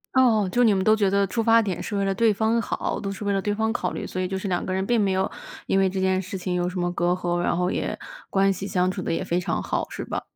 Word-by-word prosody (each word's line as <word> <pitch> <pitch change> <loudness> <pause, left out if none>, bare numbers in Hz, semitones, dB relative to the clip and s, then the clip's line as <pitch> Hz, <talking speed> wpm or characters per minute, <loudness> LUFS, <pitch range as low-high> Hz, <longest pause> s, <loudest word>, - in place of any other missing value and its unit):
哦， 230 -6 +4
就 245 - +2
你 225 -4 +5
们 190 -1 +1
都 215 - +5
觉 210 -3 +2
得 200 +1 +2
出 230 +5 -1
发 230 0 +5
点 190 -5 -3
是 210 - -4
为 200 - +1
了 195 0 +1
对 225 +1 +3
方 220 +3 +1
好， - - -3
都 200 - -4
是 195 +1 -6
为 205 - 0
了 195 -1 +1
对 205 +1 -1
方 220 +1 0
考 185 -6 -2
虑， - - -4
所 185 - -4
以 185 - -1
就 190 +1 -3
是 195 +1 -4
两 175 -1 -1
个 185 - -2
人 190 +1 -1
并 240 +2 +2
没 195 -2 +2
有 190 +1 0 0.4
因 195 - +2
为 190 -1 +3
这 190 0 -3
件 190 0 +2
事 190 +1 -6
情 180 0 -3
有 175 0 0
什 180 +1 -5
么 175 0 0
隔 175 0 0
阂， 175 -1 -1
然 175 - +1
后 180 +1 +1
也 - - -2 0.3
关 195 0 +3
系 195 +1 -4
相 185 -2 +1
处 - - -5
得 - - -2
也 - - -1
非 175 - 0
常 180 - -2
好， - - -2
是 - - -6
吧？ - - -4
195 Hz, 340 characters per minute, -24 LUFS, 185-210 Hz, 0.4 s, 你